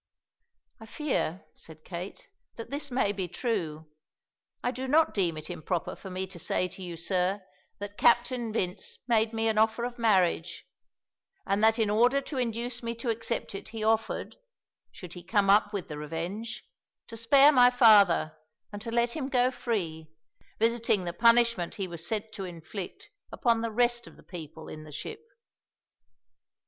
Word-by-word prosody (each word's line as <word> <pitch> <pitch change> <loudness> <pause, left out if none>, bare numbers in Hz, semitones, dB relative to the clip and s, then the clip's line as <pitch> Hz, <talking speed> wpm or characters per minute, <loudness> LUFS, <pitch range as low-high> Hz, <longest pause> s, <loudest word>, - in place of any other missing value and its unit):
"I 225 - -11
fear," 210 - -2
said 155 -1 -14
Kate, 180 +2 -7 0.3
"that 230 - -8
this 285 0 -3
may 245 -5 +1
be 190 -3 -3
true; 175 -6 -3 0.8
I 245 - +1
do 260 +1 -5
not 315 +4 +4
deem 175 -6 0
it 155 0 -7
improper 175 0 -3
for 190 - -10
me 185 +1 -3
to 185 -2 -12
say 180 - 0
to 190 - -11
you, 175 -2 -6
sir, 185 +3 0 0.3
that 205 0 -8
Captain 240 -1 +3
Vince 180 -5 -3
made 225 -2 +3
me 225 0 0
an 220 -1 +2
offer 220 +2 +2
of 245 0 -4
marriage, 185 -7 +1 0.8
and 200 +2 0
that 225 +1 +5
in 220 -3 +1
order 245 +6 +4
to 275 -1 -5
induce 240 0 -2
me 230 0 -3
to 230 +1 -2
accept 230 0 -3
it 195 - -7
he 225 -1 -5
offered, 220 0 0 0.5
should 180 -2 -10
he 175 - -8
come 195 +2 +3
up 205 0 +4
with 200 -5 -4
the 150 -1 -6
Revenge, 170 +9 -5 0.4
to 230 - -8
spare 275 +6 +6
my 250 -3 +7
father 205 -10 +5 0.4
and 205 - -6
to 230 - -6
let 235 +1 +1
him 275 -4 -3
go 250 -1 +3
free, 175 -11 -3 0.5
visiting 225 -3 +2
the 175 -1 -4
punishment 235 -4 +3
he 195 -2 -3
was 170 -2 -7
sent 220 +4 -3
to 200 -3 -6
inflict 185 - -8 0.2
upon 230 -2 +1
the 230 - -1
rest 240 +1 +1
of - - -15
the - - -17
people 160 -2 -9
in 155 - -8
the 155 - -12
ship." 430 - -7
215 Hz, 175 wpm, -28 LUFS, 180-235 Hz, 0.8 s, my